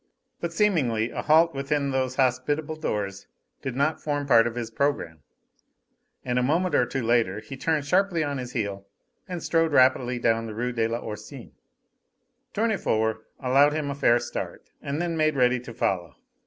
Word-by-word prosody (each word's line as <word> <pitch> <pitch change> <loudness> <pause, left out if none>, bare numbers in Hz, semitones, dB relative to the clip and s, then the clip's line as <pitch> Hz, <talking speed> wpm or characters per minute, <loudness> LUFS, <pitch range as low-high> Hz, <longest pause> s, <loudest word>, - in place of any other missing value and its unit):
But 170 - -3
seemingly 140 - +1
a - - -3
halt 160 +2 +4
within 140 0 -1
those 130 -1 -1
hospitable 145 +4 0
doors 100 -10 -3 0.3
did 130 -3 -4
not 140 +4 0
form 145 -1 -2
part 115 -4 +5
of 120 - -5
his 115 -2 -4
programme, 115 - -1 1.1
and 125 0 +1
a - - +1
moment 165 +8 +1
or 125 - +3
two 135 +1 -3
later 115 -4 +2
he 110 +5 -9
turned 150 +1 -1
sharply 180 0 +2
on 145 -2 -2
his 125 0 -6
heel 100 -4 -3 0.4
and 180 -3 -5
strode 165 -2 +1
rapidly 130 -2 +4
down 115 -1 +1
the 110 - -7
Rue 125 +2 -2
de 115 -2 0
l'Oursine. 115 +2 -6 1.0
Tournefort 110 - 0
allowed 140 +3 +4
him 150 -2 -2
a - - -2
fair 135 -4 +3
start, 120 0 -6
and 140 +2 -3
then 170 -1 -1
made 155 -1 +2
ready 125 -1 +3
to 125 0 -10
follow. 95 -8 -2
130 Hz, 170 wpm, -26 LUFS, 115-150 Hz, 1.1 s, part